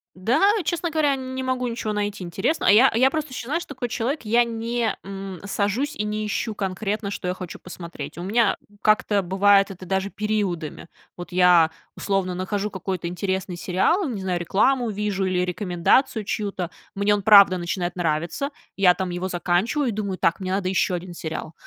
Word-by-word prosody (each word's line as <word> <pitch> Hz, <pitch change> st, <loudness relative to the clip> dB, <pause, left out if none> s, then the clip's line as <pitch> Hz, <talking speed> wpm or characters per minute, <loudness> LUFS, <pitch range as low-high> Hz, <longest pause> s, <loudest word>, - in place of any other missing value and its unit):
Да, 225 Hz, -, +1 dB, 0.2 s
честно 340 Hz, +1 st, -1 dB
говоря, 300 Hz, -3 st, +2 dB
не 260 Hz, 0 st, -5 dB
могу 255 Hz, -1 st, -1 dB
ничего 230 Hz, -2 st, -3 dB
найти 205 Hz, -2 st, -3 dB
интересного. 190 Hz, -, 0 dB
А -, -, +8 dB
я 245 Hz, +6 st, +7 dB
я 255 Hz, +4 st, +4 dB
просто 310 Hz, -2 st, -3 dB
еще, 250 Hz, -, -6 dB
знаешь, 330 Hz, +6 st, -1 dB
такой 245 Hz, -1 st, -5 dB
человек: 250 Hz, +7 st, -2 dB
я 235 Hz, +3 st, +4 dB
не, 230 Hz, 0 st, -2 dB
м, 195 Hz, -2 st, -7 dB
сажусь 210 Hz, +9 st, -1 dB
и -, -, -2 dB
не 210 Hz, 0 st, -2 dB
ищу 215 Hz, +1 st, -2 dB
конкретно, 200 Hz, +1 st, -3 dB
что 180 Hz, -, -4 dB
я 180 Hz, -, 0 dB
хочу 185 Hz, -2 st, -8 dB
посмотреть. 170 Hz, -2 st, -8 dB
У -, -, -5 dB
меня 220 Hz, +1 st, +2 dB, 0.3 s
как-то 215 Hz, -1 st, +3 dB
бывает 195 Hz, +2 st, +4 dB
это 185 Hz, -1 st, -9 dB
даже 190 Hz, +1 st, -1 dB
периодами. 195 Hz, -7 st, -3 dB, 0.3 s
Вот 175 Hz, +1 st, -8 dB
я, 180 Hz, -3 st, +5 dB, 0.3 s
условно, 195 Hz, -2 st, -1 dB
нахожу 200 Hz, +3 st, -2 dB
какой-то 185 Hz, -2 st, -4 dB
интересный 185 Hz, +1 st, -3 dB
сериал, 240 Hz, -, +1 dB
не 220 Hz, -6 st, -4 dB
знаю, 180 Hz, -2 st, -1 dB
рекламу 235 Hz, +8 st, +2 dB
вижу 205 Hz, -2 st, -2 dB
или 180 Hz, -1 st, +1 dB
рекомендацию 185 Hz, +5 st, +1 dB
чью-то. 200 Hz, -4 st, -3 dB, 0.3 s
Мне 200 Hz, +1 st, +3 dB
он 205 Hz, -, -1 dB
правда 200 Hz, -2 st, +8 dB
начинает 175 Hz, 0 st, -2 dB
нравиться, 170 Hz, -, -1 dB, 0.3 s
я 185 Hz, -2 st, +5 dB
там 185 Hz, -1 st, -3 dB
его 175 Hz, +2 st, -3 dB
заканчиваю, 190 Hz, +10 st, 0 dB
и -, -, -4 dB
думаю: 200 Hz, -3 st, -3 dB
"Так, 170 Hz, -, +1 dB
мне 185 Hz, -1 st, -3 dB
надо 190 Hz, -1 st, 0 dB
ещё 185 Hz, 0 st, +1 dB
1 175 Hz, 0 st, -5 dB
сериал". 160 Hz, -1 st, -5 dB
200 Hz, 185 wpm, -23 LUFS, 180-225 Hz, 0.3 s, А